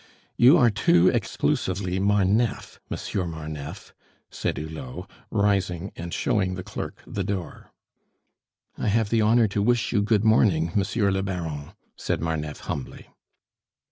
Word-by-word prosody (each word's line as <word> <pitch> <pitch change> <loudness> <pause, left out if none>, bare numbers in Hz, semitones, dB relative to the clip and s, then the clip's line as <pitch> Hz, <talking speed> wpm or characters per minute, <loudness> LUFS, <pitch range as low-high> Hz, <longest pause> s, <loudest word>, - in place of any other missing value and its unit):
"You 130 +8 +7
are 120 -6 +5
too 90 -3 +4
exclusively 95 0 -1
Marneffe, 105 +3 +1
Monsieur 90 -3 -3
Marneffe," 80 -3 -7 0.4
said - - -2
Hulot, 75 -5 -7 0.2
rising 95 -3 0
and 85 0 -6
showing 95 -2 0
the 90 - -6
clerk 105 +1 -7
the 100 - -3
door. 95 -2 -5 1.1
"I - - -1
have 110 0 +1
the 115 -1 +3
honor 110 +1 +4
to 100 +1 -1
wish 115 +2 +1
you 105 - +2
good 105 0 +2
morning, 95 -7 +3
Monsieur 100 +1 +1
le 95 0 0
Baron," 80 -6 -4 0.2
said - - -2
Marneffe 80 -2 -3
humbly. 70 - -6
95 Hz, 135 wpm, -25 LUFS, 85-105 Hz, 1.1 s, You